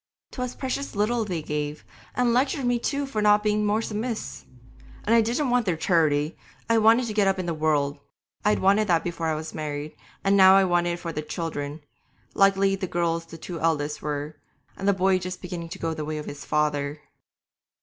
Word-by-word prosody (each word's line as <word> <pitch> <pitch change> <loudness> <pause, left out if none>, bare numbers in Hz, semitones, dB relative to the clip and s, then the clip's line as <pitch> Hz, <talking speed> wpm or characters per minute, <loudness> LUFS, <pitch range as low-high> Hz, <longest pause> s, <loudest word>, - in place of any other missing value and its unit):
'Twas 250 -1 -4
precious 270 0 -4
little 225 +3 +1
they 175 -6 -3
gave, 150 0 -4 0.3
and 245 -2 +2
lectured 265 +2 +1
me 245 -1 +2
too 280 +3 -1
for 225 -6 -2
not 210 0 +4
being 210 0 +1
more 210 +2 +1
submiss'! 220 +2 -4 0.6
And 225 - +2
I 230 - +6
didn't 245 +4 0
want 245 -3 +2
their 175 -3 +1
charity; 155 -3 +2 0.3
I 230 0 +4
wanted 225 +3 +5
to 220 - -4
get 205 -2 +3
up 195 - +2
in 185 - -3
the 170 - -1
world. 150 -2 0 0.4
I'd 210 +1 +3
wanted 200 +3 +3
that 170 -3 +2
before 170 -1 -3
I 160 - 0
was 155 +1 -6
married, 150 -1 -5 0.3
and 195 0 +3
now 190 -1 +8
I 195 - +6
wanted 175 -1 +1
it 170 - -5
for 170 -1 -5
the 150 - -2
children. 155 -2 -5 0.5
Likely 195 0 +4
girls 170 -3 -1
the 165 - -10
two 170 +1 -7
eldest 150 -2 0
were, 150 0 -4 0.4
and 195 - -4
the 200 - +5
boy 190 0 +2
just 185 0 -5
beginning 175 -2 -6
to - - -7
go 165 -1 -2
the 155 -1 -4
way 155 +1 -4
of 150 - -5
his 145 - -8
father.' 150 -1 0
180 Hz, 205 wpm, -25 LUFS, 155-215 Hz, 0.6 s, now